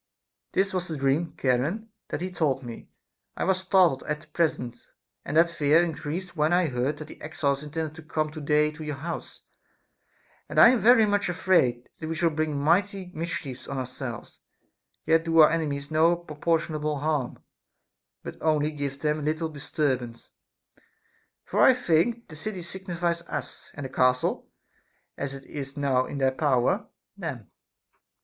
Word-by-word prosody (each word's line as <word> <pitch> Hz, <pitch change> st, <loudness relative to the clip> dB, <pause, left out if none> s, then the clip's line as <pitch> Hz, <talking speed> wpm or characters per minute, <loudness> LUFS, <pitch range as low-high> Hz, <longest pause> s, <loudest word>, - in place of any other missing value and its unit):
This 190 Hz, 0 st, +1 dB
was 180 Hz, -1 st, -1 dB
the 160 Hz, -, -4 dB
dream, 140 Hz, +4 st, 0 dB
Charon, 145 Hz, -, 0 dB, 0.2 s
that -, -, -4 dB
he 185 Hz, +1 st, -3 dB
told 140 Hz, -7 st, 0 dB
me. 120 Hz, -2 st, -9 dB, 0.5 s
I -, -, -1 dB
was 190 Hz, 0 st, +2 dB
startled 185 Hz, -7 st, +3 dB
at 150 Hz, 0 st, -2 dB
the -, -, -16 dB
present, 125 Hz, -8 st, -1 dB, 0.4 s
and 155 Hz, -, -2 dB
that 165 Hz, +1 st, +7 dB
fear 155 Hz, +1 st, +4 dB
increased 175 Hz, +2 st, -4 dB
when 155 Hz, 0 st, +2 dB
I 175 Hz, -2 st, +3 dB
heard 130 Hz, +4 st, -1 dB
that 155 Hz, -, -8 dB
the -, -, -13 dB
exiles 140 Hz, -3 st, -1 dB
intended 155 Hz, +1 st, -4 dB
to -, -, -8 dB
come 155 Hz, 0 st, -2 dB
to 155 Hz, 0 st, -7 dB
day 150 Hz, +1 st, +3 dB
to 155 Hz, +1 st, -9 dB
your 150 Hz, -1 st, -3 dB
house, 165 Hz, +5 st, -6 dB, 1.1 s
and -, -, -6 dB
I -, -, +10 dB
am 250 Hz, -1 st, +3 dB
very 225 Hz, +2 st, +6 dB
much 205 Hz, -2 st, +1 dB
afraid 170 Hz, -10 st, +2 dB
that 155 Hz, -, -5 dB
we 165 Hz, -, -2 dB
shall 170 Hz, 0 st, +2 dB
bring 155 Hz, -2 st, -1 dB
mighty 185 Hz, +4 st, +1 dB
mischiefs 150 Hz, -6 st, -5 dB
on 140 Hz, -, -4 dB
ourselves, 130 Hz, -2 st, -6 dB, 0.7 s
yet 160 Hz, +1 st, +4 dB
do 165 Hz, 0 st, +1 dB
our 155 Hz, -2 st, +8 dB
enemies 145 Hz, -3 st, -2 dB
no 160 Hz, +2 st, +4 dB
proportionable 155 Hz, -2 st, -1 dB
harm, 150 Hz, -5 st, -1 dB, 0.9 s
but -, -, -8 dB
only 155 Hz, -1 st, +2 dB
give 140 Hz, -2 st, -4 dB
them 150 Hz, 0 st, +1 dB
a -, -, -6 dB
little 155 Hz, +2 st, -1 dB
disturbance; 135 Hz, -5 st, -2 dB, 1.1 s
for -, -, 0 dB
I 260 Hz, -, +7 dB
think 235 Hz, +2 st, +1 dB
the 155 Hz, -, -11 dB
city 185 Hz, +3 st, -5 dB
signifies 175 Hz, -2 st, -3 dB
us, -, -, -6 dB
and 145 Hz, -, -6 dB
the -, -, -5 dB
castle 125 Hz, 0 st, +1 dB, 0.7 s
(as 140 Hz, -1 st, -4 dB
it 135 Hz, -, -11 dB
is 140 Hz, 0 st, -7 dB
now 135 Hz, -3 st, +1 dB
in -, -, -5 dB
their 135 Hz, -1 st, +2 dB
power) 130 Hz, -3 st, +1 dB, 0.3 s
them. -, -, -6 dB
155 Hz, 170 wpm, -27 LUFS, 140-170 Hz, 1.1 s, I